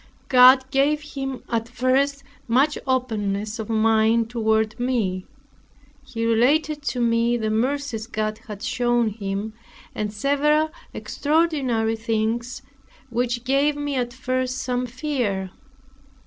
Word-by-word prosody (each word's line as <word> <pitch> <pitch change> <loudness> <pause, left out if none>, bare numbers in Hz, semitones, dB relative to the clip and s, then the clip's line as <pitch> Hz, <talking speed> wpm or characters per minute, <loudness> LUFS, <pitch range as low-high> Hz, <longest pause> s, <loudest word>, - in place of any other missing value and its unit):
God 255 +1 +7
gave 290 +2 +2
him 270 -2 -4
at 230 0 -2
first 265 +3 +1 0.2
much 270 +6 +3
openness 215 -5 -1
of 220 - -5
mind 225 +1 +2
toward 220 -1 0
me. 220 -8 -1 0.8
He 240 -4 -4
related 290 +7 +2
to 250 - -4
me 235 0 +2
the 220 -2 -2
mercies 245 0 -1
God 215 -1 -3
had 210 -1 -8
shown 240 -2 +1
him, 205 0 -4 0.4
and 210 -1 -3
several 290 +7 +1 0.2
extraordinary 285 -8 0
things, 225 +3 -2 0.5
which 240 0 -1
gave 275 +3 +2
me 290 0 -3
at 245 -2 -1
first 255 0 -2
some 250 -1 -2
fear. 240 -8 -2
240 Hz, 120 wpm, -23 LUFS, 220-270 Hz, 0.8 s, God